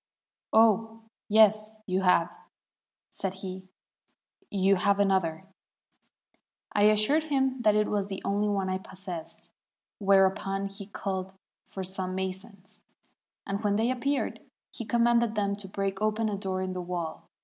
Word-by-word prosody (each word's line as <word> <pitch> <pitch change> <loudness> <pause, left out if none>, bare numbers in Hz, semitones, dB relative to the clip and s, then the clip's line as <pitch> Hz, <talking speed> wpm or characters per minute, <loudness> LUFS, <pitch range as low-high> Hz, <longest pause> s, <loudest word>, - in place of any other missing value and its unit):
'Oh, 225 0 +3 0.3
yes, 215 0 +4
you 185 0 0
have,' 180 - +2 0.7
said 195 -1 -3
he; 185 0 -7 0.8
'you 195 0 +3
have 200 +2 +2
another.' 190 -4 +1 1.3
I 205 - +4
assured 215 +9 +4
him 265 -3 0
that 215 -2 +4
it 210 0 +2
was 200 -1 -1
the 195 -1 -5
only 205 +1 +1
one 200 -2 0
I 185 0 -1
possessed, 185 -3 -8 0.5
whereupon 195 0 +2
he 195 0 -9
called 190 -2 -4 0.3
for 190 - -6
some 185 0 -3
masons, 190 +1 -6 0.6
and 200 +2 -3
when 205 -1 +2
they 225 +4 +2
appeared, 275 +3 -1 0.3
he 235 - -6
commanded 235 0 +2
them 200 -1 0
to 205 -1 -8
break 195 0 -3
open 215 +1 +1
a 205 - -2
door 190 -1 -3
in 185 0 -3
the 180 - -4
wall. 175 -2 -5
200 Hz, 140 wpm, -28 LUFS, 190-215 Hz, 1.3 s, yes